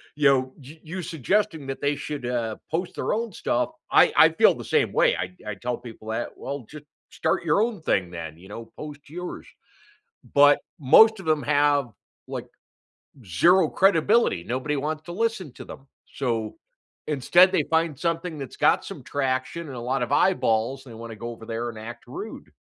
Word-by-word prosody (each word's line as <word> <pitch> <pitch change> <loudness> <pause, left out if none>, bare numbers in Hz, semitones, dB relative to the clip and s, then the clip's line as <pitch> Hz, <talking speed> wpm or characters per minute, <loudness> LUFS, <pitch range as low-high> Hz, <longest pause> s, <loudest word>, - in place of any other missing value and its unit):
you 145 -1 +3
know, 130 -1 +1
y 150 +5 -13
you 180 +4 -5
suggesting 170 - -1
that 135 - -5
they 145 +1 +1
should, 145 -3 -5
uh, 115 -3 -2
post 175 +3 -2
their - - -1
own 225 0 -2
stuff- - - -1 0.2
I - - +6
I - - +8
feel - - +5
the - - -8
same - - +1
way, - - +4
I 90 - -2 0.2
I - - -5
tell 120 +5 -3
people 115 -2 -11
that, 115 +2 -4
"Well, 140 -2 -6
ju 150 -1 -10 0.3
start - - -1
your 165 +4 +2
own 225 -7 -3
thing 95 - 0
then," 80 -3 -7
you 90 +3 -15
know, 115 +3 -8
"post 150 -2 -9
yours"- 180 +3 -7 0.9
but 145 0 +6 0.2
most 215 +11 +6
of 185 - -9
'em 155 -2 +2
have, 145 -3 +2 0.4
like, - - -6 0.8
zero 170 - +4
credibility, 195 - +3
nobody 130 +7 -2
wants 155 +2 -3
to 175 - -7
listen 190 - -3
to - - -10
them, 135 - -12 0.3
so 115 -4 -1 0.5
instead 175 +6 +5
they 175 -5 +2
find 160 -2 0
something 165 0 -2
that's 135 -3 -7
got - - +3
some - - -8
traction 135 +4 -2
and 135 - -8
a - - -5
lot 135 -1 +1
of 120 - -4
eyeballs, 130 -6 +1
and 125 - -12
they - - -10
wanna 115 -1 -8
go 120 +2 -6
over 115 -1 -11
there 115 +1 -3
and 115 - -9
act 115 +2 -9
rude. 385 +5 -8
145 Hz, 190 wpm, -25 LUFS, 120-165 Hz, 0.9 s, I